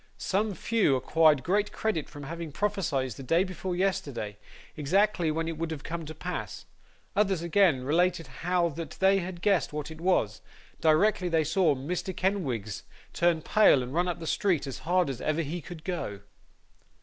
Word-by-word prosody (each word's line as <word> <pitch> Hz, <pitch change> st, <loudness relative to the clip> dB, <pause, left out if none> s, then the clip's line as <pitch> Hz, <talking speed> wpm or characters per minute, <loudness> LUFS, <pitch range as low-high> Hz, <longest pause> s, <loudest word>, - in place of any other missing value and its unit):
Some 205 Hz, +1 st, -1 dB
few 215 Hz, -12 st, +2 dB
acquired 150 Hz, +1 st, +3 dB
great 205 Hz, +6 st, +1 dB
credit 195 Hz, -9 st, -2 dB
from 145 Hz, -, -9 dB
having 165 Hz, +2 st, -6 dB
prophesied, 160 Hz, -8 st, -1 dB
the 115 Hz, -, -8 dB
day 165 Hz, +7 st, +2 dB
before 185 Hz, -1 st, -4 dB
yesterday, 140 Hz, -, -2 dB, 0.4 s
exactly 175 Hz, +3 st, +2 dB
when 160 Hz, +1 st, -1 dB
it 165 Hz, -1 st, -4 dB
would 160 Hz, -3 st, -4 dB
come 165 Hz, 0 st, -5 dB
to 155 Hz, +1 st, -8 dB
pass; -, -, -5 dB, 0.5 s
others, 195 Hz, -4 st, +2 dB
again, 170 Hz, -6 st, +3 dB
related, 165 Hz, +4 st, +1 dB, 0.2 s
how 175 Hz, 0 st, +2 dB
that 165 Hz, +2 st, -7 dB
they 195 Hz, +1 st, +4 dB
guessed 180 Hz, 0 st, +1 dB
what 150 Hz, +1 st, -4 dB
it 160 Hz, 0 st, -10 dB
was, 110 Hz, -, +1 dB, 0.4 s
directly 180 Hz, +4 st, +3 dB
they 165 Hz, -2 st, +2 dB
saw 160 Hz, -1 st, +2 dB
Mr. 175 Hz, +7 st, -4 dB
Kenwigs 130 Hz, -, -1 dB, 0.3 s
turn 170 Hz, -2 st, +2 dB
pale 165 Hz, -12 st, +5 dB
and 125 Hz, +2 st, -7 dB
run 175 Hz, +2 st, +1 dB
up 175 Hz, -, -2 dB
the 165 Hz, -, -6 dB
street 180 Hz, -4 st, +1 dB
as 135 Hz, -3 st, -6 dB
hard 180 Hz, 0 st, +3 dB
as 135 Hz, -3 st, -4 dB
ever 155 Hz, +2 st, 0 dB
he 165 Hz, +4 st, -4 dB
could 160 Hz, -1 st, -10 dB
go. 105 Hz, -, -4 dB
165 Hz, 170 wpm, -28 LUFS, 150-185 Hz, 0.5 s, pale